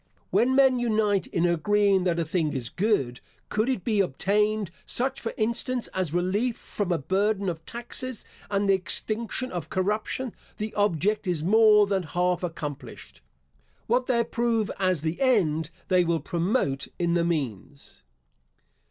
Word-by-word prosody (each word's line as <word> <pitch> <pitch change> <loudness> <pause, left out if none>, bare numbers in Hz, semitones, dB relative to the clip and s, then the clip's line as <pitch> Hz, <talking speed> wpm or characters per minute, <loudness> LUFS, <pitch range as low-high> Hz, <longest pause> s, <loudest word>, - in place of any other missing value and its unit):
When 260 +2 +3
men 265 -2 +5
unite 215 -4 +1
in 170 - 0
agreeing 195 +3 +2
that 170 -2 +1
a 170 - 0
thing 155 -1 0
is 125 -4 -3
good, 180 - 0 0.3
could 215 +4 0
it 250 -9 -1
be 215 -3 +1
obtained, 205 +4 +1
such 260 +2 -2
for 230 - -3
instance 235 +2 0
as 185 -5 -2
relief 195 +8 0
from 200 -3 -3
a 170 - +2
burden 195 +6 0
of 165 -2 -3
taxes 240 0 -4 0.2
and 200 0 0
the 195 - +5
extinction 220 +7 -1
of 175 - -5
corruption, 210 +6 -1 0.2
the 215 +1 -4
object 205 +1 +1
is 170 -4 0
more 210 +2 +6
than 195 -1 0
half 180 +2 0
accomplished. 150 - -7 0.6
What 245 +2 +1
they 245 -2 +2
approve 230 -2 0
as 185 -5 +1
the 160 +6 -2
end, 165 - +2 0.2
they 185 -1 +4
will 170 -1 +1
promote 170 - -1
in 170 -1 0
the 170 -1 +2
means. 140 - -4
195 Hz, 150 wpm, -26 LUFS, 170-220 Hz, 0.6 s, more